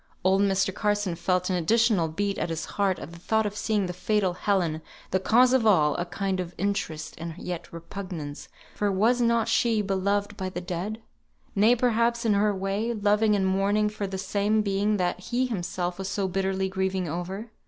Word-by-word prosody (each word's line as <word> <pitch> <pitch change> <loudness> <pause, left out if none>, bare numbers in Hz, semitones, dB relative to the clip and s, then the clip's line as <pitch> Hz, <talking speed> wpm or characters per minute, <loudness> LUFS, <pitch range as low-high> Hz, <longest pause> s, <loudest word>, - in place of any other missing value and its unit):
Old 190 +1 +3
Mr. 195 -1 +2
Carson 205 -3 0
felt 180 +2 0
an - - +1
additional 210 0 +3
beat 200 +5 -2
at - - -1
his 165 -1 -3
heart 195 -2 0
at - - -8
the 170 - -11
thought 220 +4 +1
of 205 0 -3
seeing 210 -2 0
the 180 - -4
fatal 185 +1 0
Helen, 175 -5 0 0.3
the 190 - +2
cause 245 +6 +4
of 260 -3 +4
all 160 -9 +4
a 175 - -1
kind 190 +1 -2
of 175 -1 -5
interest 175 -5 -2
and 165 -1 -5
yet 175 -2 -6
repugnance, 170 -3 -7 0.2
for 205 -1 0
was 225 +6 +2
not 235 -1 +2
she 230 -2 +2
beloved 200 +1 0
by 190 -2 -3
the 180 - -5
dead; 185 +5 -4 0.5
nay, 215 +4 +5
perhaps 235 0 +1
in 220 - +4
her 205 +1 +3
way, 200 +4 -1
loving 210 +1 +3
and 195 -2 +1
mourning 200 +3 +2
for 210 -1 -4
the 190 0 -4
same 205 +2 +1
being 205 +1 +1
that 180 -1 -1
he 245 +7 -1
himself 180 -5 -3
was 195 0 -3
so 195 -1 -1
bitterly 190 +1 -1
grieving 190 -1 -1
over? 185 +7 -5
195 Hz, 195 wpm, -26 LUFS, 180-210 Hz, 0.5 s, nay